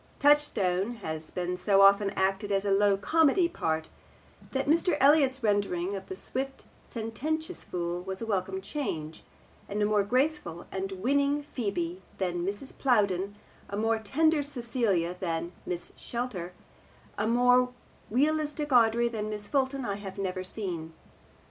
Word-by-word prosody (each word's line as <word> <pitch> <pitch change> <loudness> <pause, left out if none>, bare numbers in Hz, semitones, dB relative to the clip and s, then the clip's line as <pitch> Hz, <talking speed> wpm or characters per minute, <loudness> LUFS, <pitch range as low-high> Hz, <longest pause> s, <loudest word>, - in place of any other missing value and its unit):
Touchstone 240 -8 +3
has 155 0 -4
been 180 0 -2
so 195 +2 +3
often 200 +1 +6
acted 195 +2 0
as 195 0 +1
a 200 - +1
low 200 0 +4
comedy 325 - +3
part 160 - -2 0.6
that 265 0 -1
Mr. 325 +1 +3
Elliott's 275 -2 +4
rendering 200 -3 +1
of 190 -1 -7
the 190 - -5
swift 270 +7 -5 0.2
sententious 310 +10 -3
fool 175 0 -3
was 190 +1 -5
a 230 - -4
welcome 190 -2 -1
change, 180 - -4 0.5
and 205 - -2
a 210 - +3
more 210 -1 +3
graceful 250 - 0
and 195 0 -3
winning 280 +8 +1
Phebe 190 - -3 0.2
than 175 -2 -1
Mrs. 205 +8 -4
Plowden, 200 -6 +1 0.3
a 200 - -4
more 225 +1 +1
tender 305 +8 +2
Celia 235 -10 -1
than 170 -2 -2 0.2
Miss 175 -1 -4
Schletter, 230 -8 -4 0.6
a 210 +1 -1
more 250 +2 +4 0.4
realistic 300 +3 +1
Audrey 235 -1 +5
than 215 -2 -3
Miss 210 -1 -5
Fulton, 270 0 0
I 200 -2 -2
have 195 -2 -8
never 185 -1 -2
seen. 175 -5 -4
205 Hz, 145 wpm, -29 LUFS, 190-265 Hz, 0.6 s, often